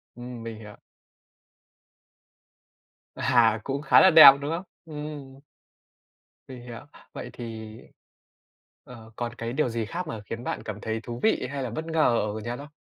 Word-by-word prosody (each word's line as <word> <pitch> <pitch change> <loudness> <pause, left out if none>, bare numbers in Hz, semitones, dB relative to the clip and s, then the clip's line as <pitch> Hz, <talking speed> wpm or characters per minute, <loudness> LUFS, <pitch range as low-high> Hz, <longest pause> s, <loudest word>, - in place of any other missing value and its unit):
Ừm, 120 -1 -9
mình 115 -1 -7
hiểu. 105 -2 -11 2.4
À, 120 -4 +3
cũng 140 +3 -3
khá 140 - +5
là 190 - +7
đẹp, 160 -5 +11
đúng 145 +2 -3
không? 170 +3 -3 0.2
Ừm. 150 -3 -8 1.1
Mình 125 -2 -10
hiểu, 120 -2 -9 0.3
vậy - - -7
thì 110 -2 -8 1.1
ờ, 115 -4 -13
còn 120 0 -5
cái 115 +1 -5
điều 140 -3 0
gì 115 -1 -3
khác 175 +7 -5
mà 110 -7 -6
khiến 115 +3 -7
bạn - - -4
cảm 105 -1 -7
thấy 110 0 -3
thú 120 0 -7
vị 220 -12 +1
hay 140 -1 -4
là 125 - -3
bất 155 +8 -5
ngờ 155 -8 +2 0.2
ở - - -4
Nhật 120 +3 -5
không? 145 - -9
120 Hz, 165 wpm, -26 LUFS, 115-145 Hz, 2.4 s, đẹp